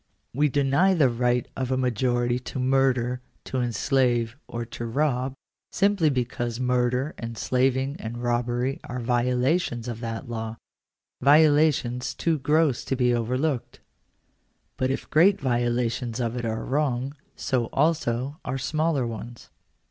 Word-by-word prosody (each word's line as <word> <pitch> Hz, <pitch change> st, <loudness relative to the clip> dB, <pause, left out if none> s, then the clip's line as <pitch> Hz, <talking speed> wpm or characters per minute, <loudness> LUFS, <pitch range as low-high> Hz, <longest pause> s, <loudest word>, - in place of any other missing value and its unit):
We 150 Hz, +3 st, +2 dB
deny 145 Hz, +8 st, +3 dB
the 145 Hz, -6 st, +4 dB
right 120 Hz, +1 st, 0 dB
of 130 Hz, -1 st, -2 dB
a 130 Hz, -, +1 dB
majority 120 Hz, 0 st, +1 dB
to 130 Hz, -, -7 dB
murder, 130 Hz, -1 st, +1 dB, 0.2 s
to 130 Hz, -, -2 dB
enslave, 120 Hz, 0 st, +1 dB
or 120 Hz, 0 st, -4 dB
to 120 Hz, -, -7 dB
rob, 130 Hz, 0 st, 0 dB, 0.4 s
simply 200 Hz, -5 st, +3 dB
because 120 Hz, -2 st, -2 dB
murder, 125 Hz, +2 st, +1 dB
en 115 Hz, 0 st, -5 dB
slaving, 130 Hz, +4 st, 0 dB
and 115 Hz, +2 st, -5 dB
robbery 120 Hz, +2 st, -1 dB
are 125 Hz, +1 st, -5 dB
violations 125 Hz, +2 st, 0 dB
of 115 Hz, -2 st, -4 dB
that 115 Hz, +1 st, -5 dB
law 115 Hz, -1 st, -5 dB, 0.3 s
— -, -, -63 dB
violations 145 Hz, -4 st, +4 dB
too 165 Hz, -2 st, 0 dB
gross 150 Hz, -1 st, +2 dB
to 135 Hz, -, -1 dB
be 125 Hz, -1 st, +2 dB
overlooked. 125 Hz, +3 st, -1 dB, 1.0 s
Sut 130 Hz, -, +1 dB
if 135 Hz, -, -3 dB
great 185 Hz, +6 st, +5 dB
violations 120 Hz, -1 st, -1 dB
of 120 Hz, -1 st, -1 dB
it 120 Hz, -1 st, -3 dB
are 110 Hz, 0 st, -2 dB
wrong, 135 Hz, -1 st, -1 dB, 0.2 s
so 125 Hz, -3 st, 0 dB
also 140 Hz, -2 st, 0 dB
are 130 Hz, +1 st, -3 dB
smaller 150 Hz, +1 st, 0 dB
ones. 115 Hz, +1 st, -8 dB
125 Hz, 140 wpm, -25 LUFS, 120-135 Hz, 1.0 s, great